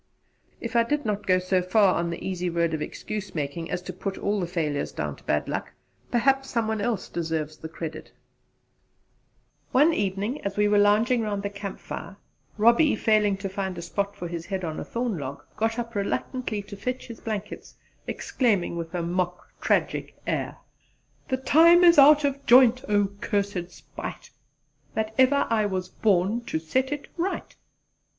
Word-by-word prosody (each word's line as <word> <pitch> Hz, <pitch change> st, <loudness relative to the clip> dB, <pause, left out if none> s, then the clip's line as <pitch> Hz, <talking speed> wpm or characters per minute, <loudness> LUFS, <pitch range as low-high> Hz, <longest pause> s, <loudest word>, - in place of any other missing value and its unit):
If 235 Hz, 0 st, -6 dB
I 235 Hz, -, +6 dB
did 290 Hz, +5 st, -1 dB
not 210 Hz, -1 st, -2 dB
go 185 Hz, -1 st, +5 dB
so 185 Hz, 0 st, +1 dB
far 185 Hz, +1 st, +4 dB
on 170 Hz, 0 st, -1 dB
the 170 Hz, -, -5 dB
easy 180 Hz, -1 st, -2 dB
road 170 Hz, -1 st, 0 dB
of 155 Hz, -, -2 dB
excuse 210 Hz, +3 st, -5 dB
making 155 Hz, +2 st, -3 dB
as 180 Hz, -, -3 dB
to -, -, -6 dB
put 195 Hz, -1 st, -4 dB
all 205 Hz, 0 st, 0 dB
the 175 Hz, -, -2 dB
failures 155 Hz, -5 st, -2 dB
down -, -, -4 dB
to -, -, -19 dB
bad -, -, 0 dB
luck, -, -, -4 dB, 0.4 s
perhaps 270 Hz, +2 st, +2 dB
some 230 Hz, -2 st, 0 dB
one 220 Hz, -1 st, -1 dB
else 220 Hz, -3 st, -1 dB
deserves 160 Hz, -2 st, -3 dB
the 160 Hz, -, -8 dB
credit. 160 Hz, -1 st, -7 dB, 1.6 s
One 295 Hz, +6 st, +5 dB
evening 205 Hz, +4 st, -1 dB
as 200 Hz, 0 st, -3 dB
we 210 Hz, 0 st, +4 dB
were 205 Hz, 0 st, +4 dB
lounging 220 Hz, +4 st, +4 dB
round 205 Hz, -2 st, -2 dB
the 200 Hz, -, -3 dB
camp 200 Hz, -1 st, -6 dB
fire, 200 Hz, -, -7 dB, 0.4 s
Robbie, 235 Hz, +7 st, +5 dB
failing 210 Hz, -2 st, +2 dB
to 195 Hz, 0 st, -4 dB
find 190 Hz, -1 st, -4 dB
a -, -, -4 dB
soft -, -, -10 dB
spot 200 Hz, 0 st, -1 dB
for 180 Hz, -3 st, -5 dB
his 170 Hz, -1 st, -6 dB
head 190 Hz, -2 st, -3 dB
on 160 Hz, -2 st, -3 dB
a -, -, -4 dB
thorn 235 Hz, -6 st, -2 dB
log, 140 Hz, 0 st, -6 dB
got 225 Hz, +1 st, 0 dB
up 235 Hz, -1 st, -4 dB
reluctantly 215 Hz, +1 st, -2 dB
to 200 Hz, +1 st, -9 dB
fetch 250 Hz, +6 st, -4 dB
his 230 Hz, -2 st, -9 dB
blankets, 210 Hz, -2 st, -6 dB, 0.3 s
exclaiming 205 Hz, -9 st, 0 dB
with 165 Hz, +1 st, -5 dB
a 175 Hz, -, -1 dB
mock 180 Hz, +1 st, -2 dB
tragic -, -, 0 dB
air: -, -, -2 dB, 0.7 s
"The 260 Hz, -, 0 dB
time 330 Hz, +6 st, +6 dB
is 340 Hz, -3 st, +7 dB
out 295 Hz, +2 st, +8 dB
of 280 Hz, 0 st, -1 dB
joint; 250 Hz, 0 st, +6 dB
O 205 Hz, -1 st, +3 dB
cursed 200 Hz, -2 st, -2 dB
spite, -, -, -9 dB, 0.6 s
That 220 Hz, 0 st, -1 dB
ever 265 Hz, +2 st, +5 dB
I 215 Hz, -2 st, +3 dB
was 185 Hz, -2 st, -3 dB
born 205 Hz, +4 st, +1 dB
to -, -, -2 dB
set 255 Hz, -, -1 dB
it 290 Hz, -1 st, -4 dB
right." 360 Hz, +3 st, -3 dB
205 Hz, 185 wpm, -26 LUFS, 180-235 Hz, 1.6 s, out